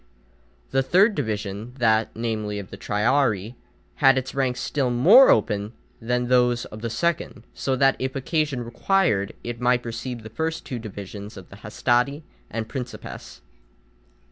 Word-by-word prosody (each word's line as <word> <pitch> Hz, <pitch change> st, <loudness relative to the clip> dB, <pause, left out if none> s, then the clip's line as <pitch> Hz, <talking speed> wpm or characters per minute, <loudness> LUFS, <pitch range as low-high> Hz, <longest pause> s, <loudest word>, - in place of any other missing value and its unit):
The 135 Hz, -, +3 dB
third 190 Hz, -, +4 dB
division, 110 Hz, -, -4 dB
that, 110 Hz, -3 st, +2 dB
namely, 110 Hz, -2 st, -3 dB
of 100 Hz, -2 st, -8 dB
the -, -, -7 dB
triarii, 115 Hz, -1 st, 0 dB, 0.4 s
had 135 Hz, -2 st, +5 dB
its 130 Hz, 0 st, -3 dB
ranks 130 Hz, -2 st, 0 dB
still 140 Hz, -4 st, -1 dB
more 180 Hz, -, +7 dB
open 105 Hz, 0 st, +1 dB, 0.3 s
than 125 Hz, +2 st, 0 dB
those 125 Hz, -1 st, +3 dB
of 110 Hz, -, -10 dB
the 115 Hz, -, -3 dB
second, 140 Hz, -1 st, -2 dB
so 135 Hz, -, -1 dB
that, 135 Hz, +1 st, +3 dB
if 130 Hz, +1 st, -3 dB
occasion 145 Hz, -2 st, -1 dB
required, 120 Hz, -, +1 dB
it 120 Hz, 0 st, -6 dB
might 125 Hz, 0 st, +2 dB
receive 115 Hz, 0 st, -5 dB
the 110 Hz, -, -10 dB
first 160 Hz, +6 st, -3 dB
two 125 Hz, -, -5 dB
divisions 100 Hz, -1 st, -8 dB
of 95 Hz, -, -11 dB
the 95 Hz, -, -12 dB
hastati 125 Hz, +7 st, 0 dB, 0.3 s
and 110 Hz, 0 st, -4 dB
principes. 125 Hz, 0 st, -8 dB
120 Hz, 150 wpm, -24 LUFS, 110-135 Hz, 0.4 s, more